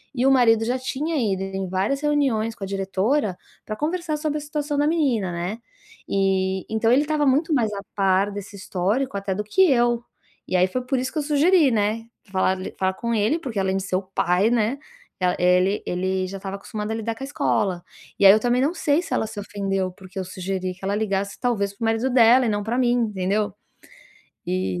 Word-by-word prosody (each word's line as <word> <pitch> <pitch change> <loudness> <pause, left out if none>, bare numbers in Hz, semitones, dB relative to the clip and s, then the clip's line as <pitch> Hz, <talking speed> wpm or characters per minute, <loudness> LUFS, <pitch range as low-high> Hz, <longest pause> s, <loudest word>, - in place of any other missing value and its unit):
E 250 0 +1
o 270 - +5
marido 225 -4 +4
já 250 +2 -1
tinha 290 +5 -3
ido 195 -6 0
em 195 -1 -4
várias 195 +10 -1
reuniões 265 -7 +1
com 210 - -9
a 195 - -3
diretora 195 +3 0 0.3
pra 215 - -4
conversar 315 +3 -2
sobre 300 -1 -2
a - - -9
situação 295 0 -3
da 290 +1 +2
menina, 260 - +1
né. 175 +6 -4 0.5
E 190 -1 0
então 220 +1 +1
ele 285 +4 +4
tava 300 -1 +1
muito 300 +4 +2
mais 230 -6 +2
a 200 - -4
par 195 0 +2
desse 200 0 -8
histórico 200 +5 -1
até 195 -1 -2
do 210 - -2
que 215 - +1
eu, 240 -2 +2 0.4
e - - -2
aí 180 0 +5
foi 255 +7 -3
por 265 +1 0
isso 260 +1 -3
que - - -2
eu - - +1
sugeri, 305 +2 +4
né, 220 +1 0 0.3
falar 190 0 +1 0.2
falar 190 0 +1
com 235 +2 -2
ele, 220 +8 +2
porque 245 -9 -4
além 190 0 0
de 195 - -3
ser 185 - -2
o 190 - -2
pai, 185 +2 +1
né, 240 +3 +1 0.4
eh, 180 -1 +2 0.2
ele 190 +3 0
ele 185 +1 -1
já 195 - -6
estava 195 0 -6
acostumado 210 +1 -6
a - - -1
lidar 225 0 -3
com 265 - -8
a - - -2
escola, 185 -10 0 0.4
e 200 - +4
aí 195 - +11
eu 215 - +4
também 245 +2 +1
não 290 +5 +1
sei 315 -1 +1
se - - -5
ela 220 - 0
se 215 -1 -7
ofendeu, 195 -2 -2
porque 185 +1 -14
eu 185 - -3
sugeri 185 0 -4
que 185 - -22
ela 200 +1 0
ligasse 200 -2 -2
talvez 210 -5 0
para 200 - -8
o - - +2
marido 225 +3 +1
dela 245 0 +6
e - - +1
não 205 -1 -1
pra 235 +3 -2
mim, 245 -2 +3 0.2
entendeu. 205 +1 -1 0.9
E, 90 -1 -1
215 Hz, 225 wpm, -23 LUFS, 195-260 Hz, 0.9 s, aí